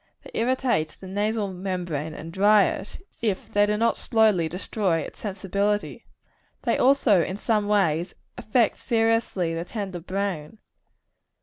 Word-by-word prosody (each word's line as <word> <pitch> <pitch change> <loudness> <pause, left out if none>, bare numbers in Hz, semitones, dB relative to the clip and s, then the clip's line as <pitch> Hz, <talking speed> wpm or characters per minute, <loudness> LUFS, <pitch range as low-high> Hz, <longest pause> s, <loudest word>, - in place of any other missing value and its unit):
They - - -12
irritate 235 -9 0
the - - -10
nasal 205 +1 -1
membrane, 175 -5 -3
and 165 +1 -8
dry 205 +2 +5
it, 205 - -5 0.2
if 210 -5 -2
they 205 0 +4
do 210 0 +1
not 230 +2 +2
slowly 215 -8 +2
destroy 180 -1 -1
its - - -9
sensibility. 200 +1 -2 0.6
They - - +1
also, 250 -8 +4
in 185 +4 -3
some 210 -1 0
way, 175 -5 +2 0.3
affect 225 0 +1
seriously 225 -7 +1
the 165 0 -3
tender 190 -2 -5
brain. 185 -1 -4
200 Hz, 135 wpm, -25 LUFS, 180-220 Hz, 0.6 s, dry